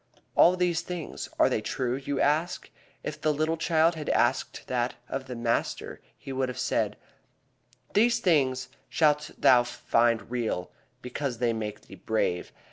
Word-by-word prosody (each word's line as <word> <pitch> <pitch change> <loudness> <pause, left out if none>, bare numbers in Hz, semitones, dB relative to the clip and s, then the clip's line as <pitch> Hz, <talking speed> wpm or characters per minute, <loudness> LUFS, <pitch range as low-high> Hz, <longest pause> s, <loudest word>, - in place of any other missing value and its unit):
All 180 - +6
these 175 -2 +1
things, 175 -3 -6
are - - +5
they - - 0
true, 125 -1 -1
you 140 +1 -3
ask? 155 +5 0 0.3
If 150 0 -5
the 155 - +2
little 155 +2 0
child 165 0 +3
had 155 -2 -5
asked - - +1
that 125 -1 -1
of 135 0 -4
the 125 - -5
master 115 0 -2 0.2
he 135 - -7
would 130 -1 0
have 125 - -6
said: - - 0 1.0
"These 235 +3 +4
things 130 - +2 0.2
shalt 150 -2 +2
thou 125 -1 +6
find 115 -1 +1
real 115 -7 -2 0.3
because 125 0 -3
they 120 -1 +1
make 105 -2 -4
thee - - -15
brave. 95 -2 -1
135 Hz, 155 wpm, -28 LUFS, 120-160 Hz, 1.0 s, All